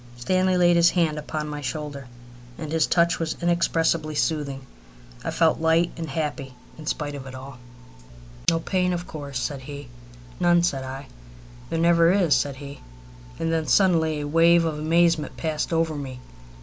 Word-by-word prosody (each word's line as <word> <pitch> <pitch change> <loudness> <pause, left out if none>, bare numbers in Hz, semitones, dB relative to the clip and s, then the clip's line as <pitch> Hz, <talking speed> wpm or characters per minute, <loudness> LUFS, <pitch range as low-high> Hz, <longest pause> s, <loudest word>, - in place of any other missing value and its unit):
Stanley 185 +8 +1
laid 175 -1 +4
his 170 0 +6
hand 160 -4 0
upon 150 0 -4
my 150 -1 -5
shoulder, 140 0 -5 0.5
and 155 -2 -6
his 160 -1 +2
touch 170 -1 +2
was 165 -1 -2
inexpressibly 165 -2 +1
soothing. 145 -4 -1 0.6
I - - -2
felt 165 -1 +2
light 165 +1 +3
and 165 -2 -6
happy, 140 -3 -4 0.2
in 155 -1 -11
spite 145 -1 -2
of 135 -2 -8
all. 130 -1 -10 0.9
"No 165 - +1
pain, 180 +1 0
of 175 0 -3
course?" 140 -5 -6
said 135 +1 -3
he. 140 -1 -9 0.5
"None," 175 -1 +4
said 140 -6 0
I. 135 +2 -7 0.6
"There 165 - -2
never 170 0 +4
is," 180 -6 +3
said 140 -2 -1
he. 140 +1 -9 0.6
And 165 0 -1
then 160 -1 -1
suddenly 160 -6 +3
a 145 - -4
wave 165 +2 +4
of 155 -2 -2
amazement 165 0 +2
passed 155 -1 -2
over 165 -1 +1
me. 135 -4 -6
160 Hz, 165 wpm, -24 LUFS, 145-170 Hz, 0.9 s, his